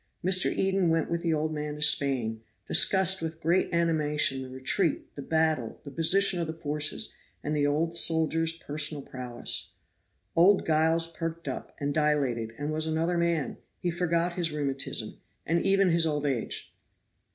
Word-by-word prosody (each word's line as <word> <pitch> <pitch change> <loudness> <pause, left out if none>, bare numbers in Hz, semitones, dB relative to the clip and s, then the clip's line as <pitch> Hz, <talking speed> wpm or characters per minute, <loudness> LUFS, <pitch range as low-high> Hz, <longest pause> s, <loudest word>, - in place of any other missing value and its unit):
Mr. 185 0 +5
Eden 190 -2 +1
went 165 -1 0
with 170 0 -1
the 170 - -1
old 155 0 -1
man 150 -1 -4
to 150 - -10
Spain, 130 -7 +2 0.3
discussed 190 -1 +3
with 160 0 -5
great 170 +3 +1
animation 150 -5 +1
the 130 - -8
retreat, 135 +6 -1
the 140 - -8
battle, 155 -6 0
the 140 - -9
position 180 +4 +3
of 165 - -2
the 160 - -5
forces, 150 -1 -1 0.3
and 150 +1 -2
the 145 -1 +1
old 165 +3 0
soldier's 165 0 +3
personal 150 -2 -3
prowess. 125 -2 -4 0.6
Old 190 +4 +4
Giles 160 +1 +2
perked 165 -1 -6
up, 130 - -6
and 145 0 -2
dilated, 140 -7 0
and 145 +1 -3
was 155 +1 0
another 165 +2 0
man; 170 -4 -1 0.2
he 175 - -2
forgot 170 0 0
his 170 -2 -2
rheumatism, 140 -3 -3 0.3
and 170 +1 +1
even 195 -1 +3
his 165 -1 +2
old 150 -1 -2
age. 135 -5 -2
160 Hz, 165 wpm, -28 LUFS, 145-170 Hz, 0.6 s, Mr